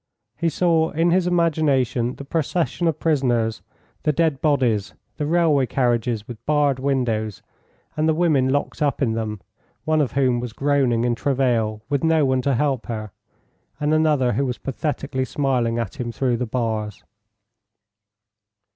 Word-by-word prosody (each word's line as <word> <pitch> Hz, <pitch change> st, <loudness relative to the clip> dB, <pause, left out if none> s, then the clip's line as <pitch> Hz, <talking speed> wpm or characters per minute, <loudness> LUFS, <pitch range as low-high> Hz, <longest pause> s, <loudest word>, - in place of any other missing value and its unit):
He 170 Hz, -, 0 dB
saw 165 Hz, 0 st, +2 dB
in 165 Hz, +2 st, +1 dB
his 180 Hz, 0 st, +2 dB
imagination 145 Hz, -8 st, +1 dB
the 140 Hz, -, -9 dB
procession 165 Hz, +1 st, -1 dB
of 160 Hz, -, 0 dB
prisoners, 120 Hz, -8 st, +1 dB, 0.4 s
the 150 Hz, -, +2 dB
dead 155 Hz, -2 st, 0 dB
bodies, 125 Hz, -9 st, +1 dB, 0.2 s
the 150 Hz, -, -2 dB
railway 155 Hz, -5 st, +3 dB
carriages 120 Hz, -4 st, 0 dB
with 120 Hz, -3 st, -9 dB
barred 145 Hz, -3 st, +2 dB
windows, 115 Hz, -7 st, -1 dB, 0.5 s
and 155 Hz, +1 st, +1 dB
the 160 Hz, -, +2 dB
women 155 Hz, -6 st, +2 dB
locked 145 Hz, +3 st, -1 dB
up 145 Hz, -1 st, +1 dB
in 115 Hz, -4 st, +1 dB
them, 110 Hz, -3 st, -3 dB, 0.4 s
one 155 Hz, -1 st, +2 dB
of 140 Hz, -, -1 dB
whom 130 Hz, -3 st, +2 dB
was 120 Hz, -2 st, -5 dB
groaning 135 Hz, -4 st, +1 dB
in 120 Hz, -1 st, +1 dB
travail 115 Hz, -4 st, 0 dB
with 140 Hz, 0 st, -1 dB
no 160 Hz, -2 st, +3 dB
one 130 Hz, -1 st, +1 dB
to 140 Hz, 0 st, +1 dB
help 135 Hz, -1 st, 0 dB
her, 110 Hz, -3 st, -5 dB, 0.7 s
and 150 Hz, +1 st, +1 dB
another 150 Hz, -6 st, +2 dB
who 140 Hz, -, 0 dB
was 125 Hz, -, -3 dB
pathetically 140 Hz, -1 st, -3 dB
smiling 130 Hz, -4 st, 0 dB
at 115 Hz, +2 st, -4 dB
him 120 Hz, -1 st, -3 dB
through 125 Hz, 0 st, 0 dB
the 125 Hz, 0 st, -3 dB
bars. 110 Hz, -3 st, -3 dB
135 Hz, 155 wpm, -22 LUFS, 120-150 Hz, 0.7 s, railway